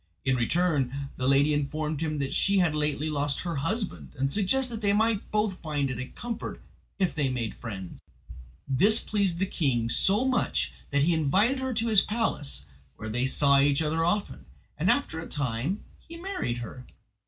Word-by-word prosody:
In 130 -1 +3
return, 140 0 0
the 130 - -2
lady 140 +2 +4
informed 150 +1 -2
him 155 -2 -1
that 140 -1 -2
she 200 0 +2
had 175 -4 +3
lately 150 0 -1
lost 145 -1 -1
her 170 -4 -3
husband, 140 - -3
and 135 +1 0
suggested 235 +4 +1
that - - -9
they 200 -1 +2
might 220 0 +1
both 210 -3 -1
find 145 -4 -1
it 125 - -5
a 130 - -4
comfort 235 - -6 0.4
if 185 -7 +1
they 145 -3 0
made 120 -4 -2
friends. 95 -6 -8 0.7
This 195 +12 +5
pleased 200 -5 0
the 190 - +1
king 125 -11 0
so 205 - +2
much 260 -2 0 0.2
that 140 0 +2
he 170 +3 +3
invited 190 - +2
her 260 0 -2
to 230 - 0
his 215 -4 +6
palace, 215 -10 -1 0.3
where 110 - -6
they 125 +4 0
saw 140 +1 +4
each 140 0 +3
other 160 +2 0
often; 195 +5 -1 0.3
and - - 0
after 280 - +1
a 165 - -7
time 145 - -1 0.2
he 335 - -12
married 345 - -3
her. 125 +3 -10
155 Hz, 185 wpm, -27 LUFS, 135-205 Hz, 0.7 s, his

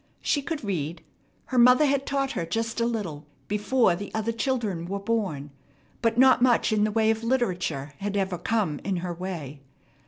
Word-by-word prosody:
She 285 - +1
could 310 0 -4
read. 170 -5 -3 0.4
Her 255 - 0
mother 250 +5 +7
had 275 -1 0
taught 275 -1 0
her - - -2
just 225 +7 -2
a 230 - +2
little 175 -11 -4 0.2
before 210 -1 +2
the 200 +3 -7
other 220 +1 0
children 220 -7 -2
were 200 +2 -2
born, 195 -9 -2 0.5
but 230 -1 +1
not 260 0 +6
much 245 -3 +3
in 210 -1 +3
the 215 - -1
way 220 0 +3
of 225 0 -3
literature 180 - -1
had 205 0 -2
ever 190 -3 -1
come 185 -7 0
in 195 - -1
her 175 - -3
way. 165 -6 -6
210 Hz, 185 wpm, -26 LUFS, 175-240 Hz, 0.5 s, mother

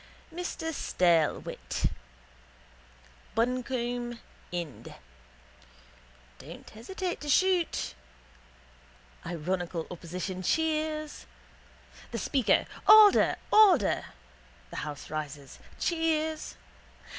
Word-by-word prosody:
Mr 325 -2 -4
Staylewit 170 - 0 1.5
(Buncombe. 240 0 -1 0.3
Ind.): 170 -6 -6 1.4
Don't - - -11
hesitate 355 - -5
to 295 - -5
shoot. 360 - +2 1.3
(Ironical 175 0 -3
opposition 180 +2 -5
cheers.) 310 - -1 0.8
The - - -4
speaker: 265 -5 +2 0.2
Order! 425 -1 +8 0.2
Order! 375 - +5 0.7
(The - - -7
house 150 -1 -6
rises. 145 -3 -6 0.2
Cheers.) 320 -2 -1
245 Hz, 65 wpm, -29 LUFS, -, 1.5 s, Order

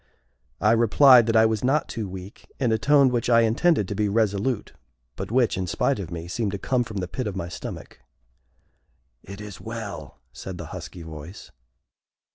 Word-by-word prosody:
I 105 - +3
replied 120 +2 +6
that 115 - +1
I 110 0 +6
was 110 0 0
not 140 +4 +1
too 110 -5 -5
weak, 95 +1 -11
in 125 -5 +1
a 110 - +1
tone 140 -2 +5
which 120 -1 -1
I 115 -1 +6
intended 115 - +2
to - - -3
be 105 0 0
resolute, 105 +2 0 0.4
but - - -6
which, 120 -5 +1
in 95 - -2
spite 130 +8 0
of 90 -5 -5
me, 85 -1 -6
seemed 105 +2 -2
to - - -2
come 125 +5 0
from 110 -3 -8
the 90 -2 -2
pit 125 +5 -4
of 100 - -4
my 85 -3 -4
stomach. - - -8 1.2
"It 100 +1 -10
is 105 -2 -9
well!" 110 -3 -7 0.2
said - - -8
the - - -7
husky 90 - -8
voice. 80 +4 -10
110 Hz, 190 wpm, -24 LUFS, 95-120 Hz, 1.2 s, replied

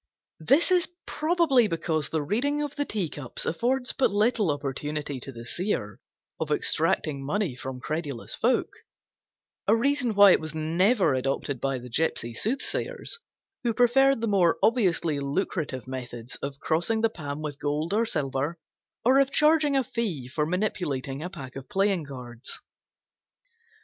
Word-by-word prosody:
This 275 - +3
is 360 -2 +3 0.2
probably 310 -7 +3
because 160 -3 -1
the 160 -2 -1
Reading 285 - 0
of 290 -1 -5
the 290 -1 -1
Tea 205 -9 -2
cups 145 -4 -5
affords 250 +8 0
but 270 - +2
little 210 -1 +2
opportunity 145 0 -3
to 135 - -8
the 115 -2 -9
Seer 120 - -2 0.4
of - - -2
extracting 140 -3 +1
money 175 -1 -1
from 130 0 -6
credulous 145 -3 -4
folk; - - +1 1.0
a 215 - +6
reason 250 -2 +1
why 200 -1 +9
it - - +5
was 155 0 -5
never 170 - +2
adopted 135 0 -1
by 135 -1 0
the 125 0 -9
gypsy 120 -3 -1
soothsayers, 260 - -2 0.4
who 235 -2 0
preferred 270 +2 +4
the 230 - 0
more 185 -5 +3
obviously 175 - +2
lucrative 140 -2 -2
methods 120 -2 -6
of 140 0 -5
crossing 175 +8 0
the 225 - +4
palm 145 -5 -6
with 145 -2 -5
gold 150 +5 -1
or 220 +2 +3
silver, 145 - -1 0.5
or 260 +3 +6
of 275 -1 +4
charging 300 -1 +4
a 265 - +2
fee 200 - -3
for 150 +3 -1
manipulating 155 -8 -2
a 175 - -4
pack 130 -6 -9
of 135 -1 -8
playing 195 -4 +1
cards. 125 -3 -6
165 Hz, 155 wpm, -27 LUFS, 140-230 Hz, 1.0 s, why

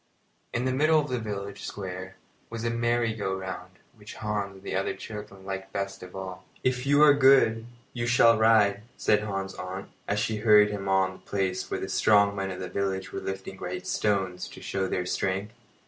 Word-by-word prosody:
In 120 +2 -1
the 130 - +1
middle 155 +4 +4
of 150 -1 -2
the 125 - -1
village 100 -2 -5
square 95 -1 -6 0.3
was 115 -1 -5
a 115 - +1
merry 120 -1 +1
go 100 -3 -2
round, 95 0 -6 0.2
which - - -12
Hans 105 -2 -3
and 95 - -15
the - - -4
other - - -1
children 105 -3 -9
liked 95 0 -5
best 100 0 -4
of 90 0 -10
all. 95 -1 -6 0.2
"If 130 0 0
you 145 +1 +6
are 150 -1 +8
good, 130 -5 +5 0.3
you 120 -1 -2
shall 115 -1 +6
ride," 105 -3 +4 0.2
said 105 - +3
Hans's 95 -2 -4
aunt, 95 +1 -6 0.2
as 100 - 0
she 105 +1 0
hurried 105 -1 +6
him 100 -1 -4
on 95 -1 +3
to 95 - -12
the - - -25
place 95 -2 -1
where - - -2
the - - -4
strong 100 -1 +4
men 95 -1 -2
of 90 - -6
the 90 - -4
village 95 -1 -2
were - - -2
lifting 95 0 -5
great 90 0 -5
stones 95 -4 0
to - - -11
show 95 -1 -2
their 90 -1 -1
strength. 95 +3 -2
100 Hz, 210 wpm, -27 LUFS, 95-115 Hz, 0.3 s, are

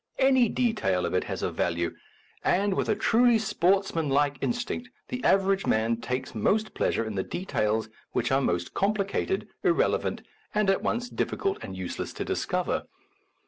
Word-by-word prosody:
Any 260 -3 +4
detail 210 - +1
of - - -2
it - - +1
has - - -4
a - - 0
value, 85 -1 -1 0.5
and, 195 +2 +2
with - - -1
a 215 - +3
truly 235 +2 +4
sportsmanlike 165 -9 +1
in - - +1
stinct, 245 0 -3 0.2
the 250 0 -4
average 195 0 +3
man 115 +1 +2
takes 125 +3 -4
most 210 - +1
pleasure 115 - 0
in 110 - -4
the 95 - 0
details 110 - -1 0.2
which - - 0
are 135 +1 +3
most 85 -7 -1
complicated, 200 - 0
irrelevant, 400 +6 +1 0.3
and 210 -2 +4
at 195 - 0
once 245 +1 -1
difficult 395 +9 -1
and 95 - -7
useless 95 -1 -4
to - - -4
discover. - - -1
195 Hz, 160 wpm, -27 LUFS, -, 0.5 s, Any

